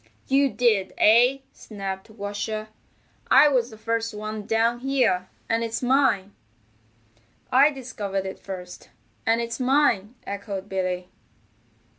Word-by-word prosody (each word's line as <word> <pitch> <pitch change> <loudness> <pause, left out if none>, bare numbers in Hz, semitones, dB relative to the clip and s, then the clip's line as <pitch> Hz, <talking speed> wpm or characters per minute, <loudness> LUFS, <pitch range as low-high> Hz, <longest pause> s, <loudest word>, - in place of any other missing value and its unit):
"You 275 +1 +3
did, 220 -7 +1
eh?" 245 +5 +5
snapped 195 -1 -7
Washer. 215 +1 -5 0.6
"I 290 +3 +7
was 250 -4 +1
the 220 - -12
first 230 0 -2
one 215 0 -6
down 230 +1 +1
here, 245 -9 +1 0.2
and 230 0 0
it's 230 +2 -3
mine." 245 -7 +2 1.2
"I 270 +3 +6
discovered 215 -8 -4
it 190 - -6
first, 180 -2 -9 0.4
and 225 +1 +3
it's 235 +1 -4
mine," 255 -5 +2
echoed 200 -1 -5
Billy. 185 -2 -2
225 Hz, 120 wpm, -24 LUFS, 200-250 Hz, 1.2 s, I